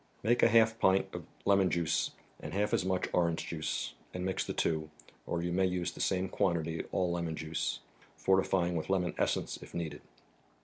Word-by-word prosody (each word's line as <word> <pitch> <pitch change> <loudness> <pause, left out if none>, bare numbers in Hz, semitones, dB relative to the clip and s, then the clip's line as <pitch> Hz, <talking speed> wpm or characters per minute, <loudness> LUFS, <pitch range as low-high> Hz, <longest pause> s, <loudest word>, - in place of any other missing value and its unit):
Make 120 +3 +3
half 115 0 +6
a - - -18
pint 95 +1 +3
of - - -6 0.2
lemon 100 -2 +4
juice 85 -3 +1 0.3
and - - -6
half 105 +1 +1
as - - +3
much 95 -1 0
orange 85 -2 +1
juice, 80 -2 -3 0.2
and 90 0 -2
mix 95 - 0
the - - -4
two; 80 -1 0 0.4
or 85 -1 -1
you 85 - -1
may 95 +1 +3
use 90 -2 -1
the - - -7
same 95 0 +1
quantity 85 -3 0
all 90 -2 +1
lemon 85 -2 -2
juice, 80 -7 -2 0.4
fortifying 95 -2 +2
with 80 +1 -3
lemon 90 -2 +1
essence, - - 0
if - - -11
needed. 85 -2 -4
90 Hz, 185 wpm, -32 LUFS, 85-95 Hz, 0.4 s, half